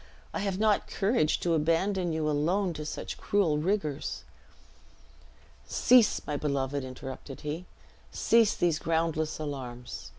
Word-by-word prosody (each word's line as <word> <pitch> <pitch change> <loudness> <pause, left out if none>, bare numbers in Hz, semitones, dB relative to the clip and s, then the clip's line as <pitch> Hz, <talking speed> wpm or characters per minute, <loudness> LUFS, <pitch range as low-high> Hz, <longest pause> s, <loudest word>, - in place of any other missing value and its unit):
I - - -2
have 195 -2 -1
not 215 0 +2
courage 195 -6 +1
to 170 - +1
abandon 170 +3 +1
you 160 -1 -1
alone 170 +6 +1
to 150 -1 -6
such - - -5
cruel 175 -8 +2
rigors." 160 -4 -2 1.4
"Cease, 245 -3 +4
my 150 - -2
beloved!" 140 -1 -1
interrupted 130 +1 -8
he, 155 +4 -4 0.5
"cease 230 -2 +3
these 170 -3 +1
groundless 160 -1 0
alarms. 125 - -6
160 Hz, 125 wpm, -29 LUFS, 145-190 Hz, 1.4 s, Cease